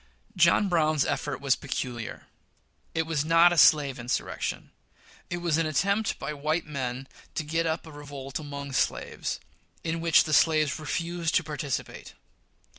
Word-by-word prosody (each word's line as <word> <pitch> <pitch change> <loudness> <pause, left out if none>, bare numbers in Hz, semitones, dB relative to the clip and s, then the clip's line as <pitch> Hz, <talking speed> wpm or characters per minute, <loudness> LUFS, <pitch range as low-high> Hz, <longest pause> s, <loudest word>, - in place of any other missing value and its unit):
John 175 +3 +4
Brown's 155 -5 +2
effort 145 -2 -2
was 140 -1 +3
peculiar. 125 -5 -5 0.7
It 165 - +2
was 160 -3 -1
not 165 +2 +5
a - - 0
slave 145 -4 +5
insurrection. 120 +2 -3 0.6
It 175 - -2
was 170 -2 0
an 165 - +1
attempt 200 +8 +1
by 140 +2 -4
white 155 +3 -1
men 135 -3 -4 0.3
to - - -1
get 165 +2 0
up 160 +1 -2
a 160 - -11
revolt 145 -2 -7
among 140 -2 -6
slaves, - - -1 0.4
in 165 0 -2
which 165 -2 +5
the 155 - -3
slaves 155 -1 +3
refused 170 +2 -2
to 180 - +3
participate. 150 -3 -5
155 Hz, 150 wpm, -27 LUFS, 140-165 Hz, 0.7 s, not